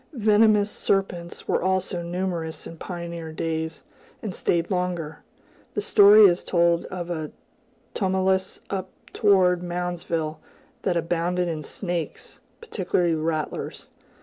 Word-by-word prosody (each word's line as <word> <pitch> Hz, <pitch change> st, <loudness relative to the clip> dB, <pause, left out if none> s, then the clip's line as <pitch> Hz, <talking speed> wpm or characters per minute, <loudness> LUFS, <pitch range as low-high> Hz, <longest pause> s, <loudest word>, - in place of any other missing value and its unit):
Venomous 210 Hz, -3 st, +4 dB
serpents 180 Hz, -3 st, -2 dB
were -, -, +1 dB
also 185 Hz, -1 st, 0 dB
numerous 170 Hz, -2 st, -3 dB
in 165 Hz, -, -8 dB
pioneer 170 Hz, -1 st, -6 dB
days, 160 Hz, 0 st, -3 dB, 0.4 s
and 210 Hz, -4 st, -3 dB
stayed 170 Hz, +1 st, 0 dB
longer. 180 Hz, -4 st, -2 dB, 0.6 s
The 205 Hz, -, 0 dB
story 205 Hz, +1 st, +7 dB
is 175 Hz, -2 st, +4 dB
told 170 Hz, -1 st, +2 dB
of 175 Hz, -2 st, -5 dB
a 155 Hz, -3 st, -3 dB, 0.6 s
tumulus 190 Hz, -1 st, 0 dB
up 190 Hz, -1 st, -3 dB, 0.2 s
toward 185 Hz, -4 st, +4 dB
Moundsville, 175 Hz, -3 st, -3 dB, 0.4 s
that 180 Hz, -3 st, 0 dB
abounded 175 Hz, +2 st, 0 dB
in 160 Hz, -2 st, -3 dB
snakes, 175 Hz, +2 st, -5 dB, 0.2 s
particularly 180 Hz, -, 0 dB
rattlers. 155 Hz, -1 st, -3 dB
175 Hz, 115 wpm, -25 LUFS, 165-190 Hz, 0.6 s, story